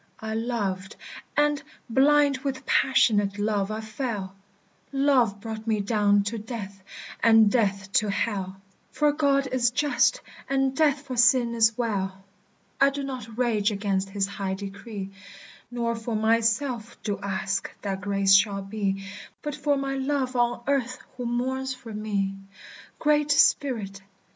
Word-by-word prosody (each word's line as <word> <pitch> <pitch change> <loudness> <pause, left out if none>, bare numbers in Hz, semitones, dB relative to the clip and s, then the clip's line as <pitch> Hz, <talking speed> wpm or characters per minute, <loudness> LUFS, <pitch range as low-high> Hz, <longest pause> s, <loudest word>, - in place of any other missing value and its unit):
"I 220 0 -4
loved, 210 -5 -2 0.4
and, 295 0 +2 0.3
blind 280 +2 +4
with 270 -2 -4
passionate 205 -6 +3
love, 205 -1 0
I 215 +1 -3
fell. 215 -4 -4 0.6
Love 270 -7 +2
brought 220 +1 -7
me 220 -2 +1
down 205 -1 +2
to 220 +3 -3
death, 205 -3 -7 0.4
and 225 -2 +6
death 195 -4 0
to 215 -2 +2
Hell; 195 -2 -2 0.3
For 300 -1 +2
God 280 -2 +2
is 250 -2 +2
just, 285 +4 +2 0.3
and 270 -1 +1
death 290 -2 +2
for 260 -3 -6
sin 245 -1 +4
is 225 -1 +3
well. 195 -5 -2 0.6
"I 275 - +7
do 280 0 -5
not 250 -5 -7
rage 225 -4 +1
against 195 -1 -1
his 195 0 0
high 195 -1 -4
decree, 195 0 -7 0.6
Nor 235 -1 -2
for 225 0 -4
myself 230 +2 +1
do 205 -2 -2
ask 200 0 -2
that 195 -1 -3
grace 195 -1 +2
shall 195 0 +4
be; 195 -1 -3 0.4
But 295 - -3
for 290 0 0
my 275 0 -2
love 265 -1 -1
on 240 0 +1
earth 255 -3 0 0.2
who 250 -1 -4
mourns 260 +2 -2
for 230 -3 -10
me. 200 -2 -2 0.6
"Great 300 -1 +2
Spirit! 230 -9 +2
225 Hz, 145 wpm, -26 LUFS, 200-265 Hz, 0.6 s, I